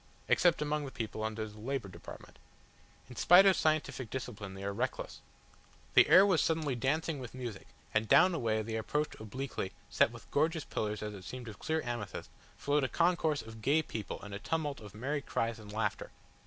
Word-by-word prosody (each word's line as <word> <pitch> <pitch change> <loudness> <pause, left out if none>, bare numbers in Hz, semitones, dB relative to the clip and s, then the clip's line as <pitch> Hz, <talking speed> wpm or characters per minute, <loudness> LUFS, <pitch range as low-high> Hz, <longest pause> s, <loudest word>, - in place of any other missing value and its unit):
Except 170 -3 +4
among 150 0 -1
the - - -5
people 110 -2 -4
under 110 0 -3
the 105 0 -13
Labour 130 -1 -3
Department. 90 -2 -11 0.7
In 125 - -11
spite 180 - +7
of 195 -1 +6
scientific 155 -6 0
discipline 105 -6 -6
they 95 - -8
are 100 0 -2
reckless - - -3 0.4
" - - -29
The - - +7
air 190 +2 +9
was 185 -5 +3
suddenly 160 -4 +1
dancing 145 +5 0
with 125 -1 -8
music, 120 -6 -6 0.3
and 110 +1 +2
down 185 - +6
a 165 - -1
way 110 -2 0
they 110 +1 -3
approached 150 +7 -2
obliquely, 110 -2 -4 0.2
set - - +4
with 120 -1 -13
gorgeous 155 +1 +1
pillars 105 0 -3
as 105 0 -4
it 95 -2 -9
seemed 125 +3 -7
of 105 -2 -9
clear 160 0 -1
amethyst, 120 -5 -5 0.3
flowed 145 0 +1
a 130 - 0
concourse 170 -3 +2
of 110 0 -11
gay 150 +7 +3
people 110 -7 -5
and 105 0 -8
a 100 - -4
tumult 150 +1 -2
of 105 -2 -12
merry 140 +6 -2
cries 115 -4 -2
and 105 -1 -10
laughter. 105 -1 -2
125 Hz, 200 wpm, -32 LUFS, 110-150 Hz, 0.7 s, air